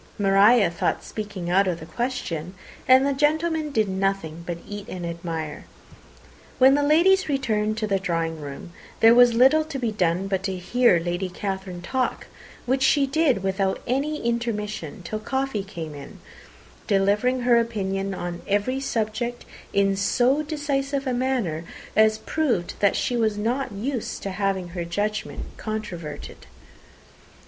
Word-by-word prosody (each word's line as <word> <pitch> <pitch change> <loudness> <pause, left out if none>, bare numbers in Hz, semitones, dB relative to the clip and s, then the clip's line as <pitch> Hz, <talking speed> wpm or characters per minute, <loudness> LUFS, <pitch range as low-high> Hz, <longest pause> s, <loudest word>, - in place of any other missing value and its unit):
Maria 200 0 +5
thought 170 - -1
speaking 205 -5 -6
out 195 +2 +4
of 175 -2 -1
the 160 - -9
question, 180 -5 -4 0.3
and 260 +1 +6
the 280 - +1
gentlemen 310 +2 +1
did 220 -6 +2
nothing 190 -4 -2
but 175 -1 -3
eat 205 -1 -7
and 180 -2 -5
admire. 165 -2 -5 0.9
When 265 +1 +7
the 290 - +3
ladies 340 +5 +4
returned 215 -6 0
to 220 - -1
the 195 -2 0
drawing 165 -4 -2
room, 145 +5 -8 0.3
there 225 +1 +7
was 245 -1 +6
little 270 +6 +5
to 310 -3 -5
be 240 -4 -1
done 180 -2 0
but 190 -1 -1
to 190 -2 -2
hear 235 +2 +3
Lady 175 +2 -2
Catherine 190 -1 -5
talk, 260 +6 -1 0.4
which 260 +2 +1
she 275 +1 +4
did 275 - +1
without 190 0 0
any 285 +5 -1
intermission 220 -4 -3
till 215 +5 -4
coffee 265 -2 -2
came 165 -6 -7
in, 140 -1 -10 0.7
delivering 210 +5 +2
her 240 -1 +4
opinion 195 -4 -2
on 175 -1 -5
every 205 +7 0
subject 240 -1 -2 0.3
in 195 0 +2
so 245 +8 +2
decisive 285 -2 -2
a 260 - 0
manner 245 -11 -1 0.3
as 215 0 +5
proved 245 - -1
that 200 -2 +3
she 245 - 0
was 220 -3 +1
not 240 +6 -1
used 230 +4 -4
to 195 - -3
have 195 0 0
her 175 0 -4
judgment 205 +5 -3
controverted. 175 - -6
210 Hz, 150 wpm, -24 LUFS, 190-255 Hz, 0.9 s, When